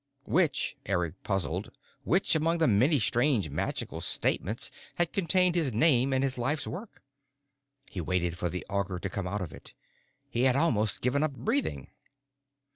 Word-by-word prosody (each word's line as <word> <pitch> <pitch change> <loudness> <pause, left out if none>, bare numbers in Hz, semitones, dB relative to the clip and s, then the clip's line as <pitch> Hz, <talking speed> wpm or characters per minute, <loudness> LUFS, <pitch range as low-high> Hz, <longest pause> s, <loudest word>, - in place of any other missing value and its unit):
Which, 165 -5 +1
Eric 90 -3 -1
puzzled, 95 -3 -1 0.4
which 180 +4 +2
among 165 +2 +2
the 160 -2 +3
many 130 +8 +4
strange 120 - +2
magical - - -3
statements 105 +7 0 0.2
had 175 -1 +1
contained 180 -1 +3
his 160 -8 +1
name 135 +1 +4
and 130 0 +2
his 130 -2 -1
life's 140 +5 0
work? 200 +5 -8 0.8
He 90 - -5
waited 85 0 -1
for 90 0 -2
the 90 +2 -5
Augur 100 -2 -2
to 95 - -4
come 100 -2 -3
out 105 +3 -2
with 85 -5 -5
it. - - -12 0.5
He 120 +2 0
had 130 -1 +4
almost 110 -9 +1
given 125 +4 +1
up 155 -2 0
breathing. 75 - -1
120 Hz, 160 wpm, -29 LUFS, 95-155 Hz, 0.8 s, many